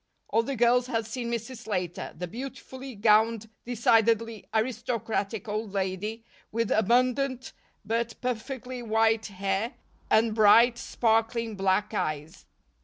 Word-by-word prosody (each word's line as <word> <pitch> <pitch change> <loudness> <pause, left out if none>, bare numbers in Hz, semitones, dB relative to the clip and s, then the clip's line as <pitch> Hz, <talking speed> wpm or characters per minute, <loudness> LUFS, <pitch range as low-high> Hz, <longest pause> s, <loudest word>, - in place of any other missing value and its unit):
All 225 - +3
the 270 +4 -3
girls 240 +1 +3
had 225 -3 -1
seen 235 +2 -4
Mrs. 235 +2 -4
Slater, 185 -7 -3
the 180 +2 -4
beautifully 260 +3 -8
gowned, 220 +1 +3 0.2
decidedly 230 -2 +2
aristocratic 225 -2 -2
old 210 -1 -3
lady 200 +4 -2 0.3
with 230 0 -1
abundant 255 +4 +1 0.3
but 230 +2 -2
perfectly 250 +1 -4
white 225 -1 +2
hair 195 +3 -2 0.3
and 220 0 +4
bright, 230 +3 +6
sparkling 225 0 0
black 195 +2 +1
eyes. 155 -5 -3
225 Hz, 115 wpm, -27 LUFS, 210-240 Hz, 0.3 s, bright